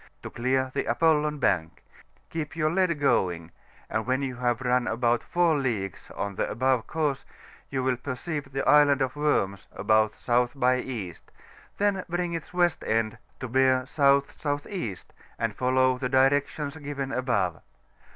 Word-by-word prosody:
to - - -7
clear 130 +2 0
the - - -1
ApoUon 150 -2 +2
Bank; 85 -9 0 0.5
keep 160 -2 -4
your 155 -1 +1
lead 175 -3 +1
going, 90 - +1 0.4
and 110 +1 -2
when 130 +2 +1
you 130 -2 -4
have 120 -1 0
run 125 -1 +1
about 120 +1 +1
4 175 -2 +2
leagues 110 - -3
on 100 0 -3
the - - -2
above 130 0 +1
course, 150 -4 -1 0.5
you 130 -1 -2
will 130 -1 +1
perceive 140 +2 -5
the 135 0 -2
Island 145 -2 +5
of 130 +1 -3
Worms 100 -10 0
about 110 +2 +2
S. 120 0 +2
by 125 -1 +2
E., 110 -9 -5 0.6
then 200 -2 +1
bring 175 0 -1
its 165 -1 -5
west 175 -3 +1
end 110 0 0 0.2
to 130 - -4
bear 130 +1 +3
S.S.E., 140 - 0 0.4
and - - -2
follow 130 0 +2
the 125 -1 -2
directions 140 +2 +2
given 140 -2 -5
above. 100 - 0
130 Hz, 150 wpm, -27 LUFS, 120-145 Hz, 0.6 s, Island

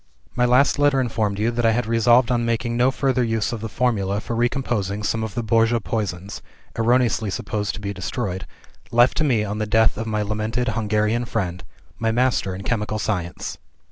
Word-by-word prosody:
"My 125 - +3
last 130 +4 +3
letter 145 -2 +4
informed 110 -5 -1
you 110 +3 +1
that 120 0 -2
I 115 -1 +4
had 120 +1 0
resolved 115 +2 +4
on 120 -1 +1
making 115 0 -1
no 125 +2 +4
further 130 -1 +1
use 115 -1 -1
of 115 - -5
the 110 - -4
Formula 105 -3 0
for 115 - -4
recomposing 115 -4 -1
some 110 +1 -1
of 110 -1 -5
the 120 - -1
Borgia 115 +2 +3
Poisons 100 -4 -4 0.3
(erroneously 115 -2 +2
supposed 105 +1 -3
to - - -7
be 100 0 -4
destroyed) 95 0 -4 0.4
left 120 +2 +4
to 155 - +2
me 120 -8 +2
on 105 +1 -4
the 105 - -1
death 110 +1 +3
of 110 +1 -4
my 105 -1 0
lamented 110 +4 -1
Hungarian 110 +2 0
friend 90 -6 -3 0.4
my 115 0 +1
master 120 -5 +1
in 95 - -7
chemical 110 -1 -1
science. 90 -5 -3
115 Hz, 195 wpm, -22 LUFS, 105-120 Hz, 0.4 s, letter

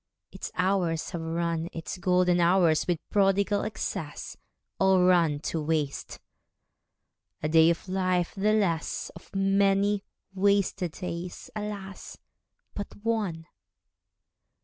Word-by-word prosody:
Its - - -7
hours 180 -4 0
have 170 -3 -4
run, 165 0 -2
Its 165 +2 -6
golden 180 -1 +3
hours, 170 -2 +3
with 175 -2 +1
prodigal 200 0 +3
excess, 190 -7 -4 0.4
All 190 -1 +4
run 170 -5 +4
to 160 0 -2
waste. 150 -2 -2 1.2
A - - +2
day 160 +1 +6
of 170 +3 -1
life 185 -2 0
the 205 +2 +1
less; 175 -7 0
Of 170 - -13
many 195 +1 +2 0.3
wasted 195 -3 +1
days, 175 0 -6
alas, 205 -2 -6 0.6
but 205 - -4 0.2
one! 205 -8 -1
180 Hz, 110 wpm, -28 LUFS, 165-195 Hz, 1.2 s, day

